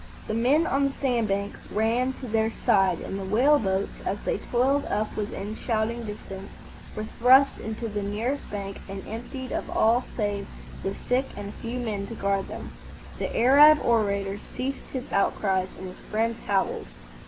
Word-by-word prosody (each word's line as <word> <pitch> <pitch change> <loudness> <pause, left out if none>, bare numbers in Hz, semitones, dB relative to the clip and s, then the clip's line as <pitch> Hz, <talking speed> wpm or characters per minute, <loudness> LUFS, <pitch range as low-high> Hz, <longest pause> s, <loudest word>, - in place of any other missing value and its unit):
The - - -2
men 260 +8 +3
on 275 -2 +2
the 275 - 0
sand 245 -6 0
bank 200 0 -1 0.2
ran 235 +5 +1
to 255 - -8
their 220 0 +1
side; 195 -7 +2
and 195 - -4
the - - -4
whale 250 +10 +4
boats, 195 -1 -1
as 200 - -1
they - - 0
toiled 270 +4 +1
up 210 +1 -1
within 205 0 -4
shouting 230 +1 -1
distance, 195 -2 -8 0.4
were 215 - -3
thrust 260 +3 +6
into 220 +1 -4
the 205 -1 -3
nearest 225 +8 -2
bank 200 -1 -5
and 195 0 -6
emptied 245 +3 -6
of - - -3
all 235 +3 +3
save 205 -3 -1 0.3
the 195 0 -2
sick 255 +2 +2
and 205 0 -5
a - - -11
few 235 +2 -3
men 210 -5 -3
to 230 - -7
guard 195 -1 0
them. - - -7 0.5
The - - -2
Arab 290 +6 +8
orator 200 -3 +1
ceased 265 +5 -5
his 260 -2 -3
outcries, 190 -1 +1
and 190 - -7
his 180 - -12
friends 225 +2 0
howled. 195 -2 0
220 Hz, 175 wpm, -26 LUFS, 200-250 Hz, 0.5 s, Arab